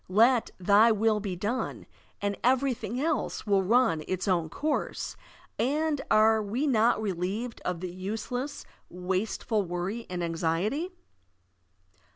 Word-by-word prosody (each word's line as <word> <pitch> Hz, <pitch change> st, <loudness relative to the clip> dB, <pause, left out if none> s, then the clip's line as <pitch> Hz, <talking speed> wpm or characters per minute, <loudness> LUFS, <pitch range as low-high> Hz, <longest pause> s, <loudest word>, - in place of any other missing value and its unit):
Let 230 Hz, +5 st, +4 dB
"thy 205 Hz, +5 st, +5 dB
will 215 Hz, 0 st, +2 dB
be 195 Hz, -3 st, -4 dB
done, 210 Hz, +8 st, -3 dB, 0.4 s
and 200 Hz, 0 st, 0 dB
everything 250 Hz, -2 st, +1 dB
else 315 Hz, +2 st, -1 dB
will 200 Hz, -2 st, +3 dB
run 195 Hz, -6 st, +3 dB
its 185 Hz, +2 st, -2 dB
own 170 Hz, -4 st, +1 dB
course, 300 Hz, -, -2 dB, 0.4 s
and 295 Hz, +4 st, +1 dB
are 220 Hz, +1 st, +5 dB
we 225 Hz, +8 st, -1 dB
not 235 Hz, -5 st, +3 dB
relieved 205 Hz, +4 st, -3 dB
of 180 Hz, -2 st, -3 dB
the 180 Hz, -1 st, -4 dB
useless, 225 Hz, +9 st, -4 dB, 0.2 s
wasteful 190 Hz, +4 st, -1 dB
worry 185 Hz, +5 st, -4 dB
and 180 Hz, -1 st, -3 dB
anxiety? 170 Hz, -, -1 dB
215 Hz, 125 wpm, -28 LUFS, 185-245 Hz, 0.4 s, thy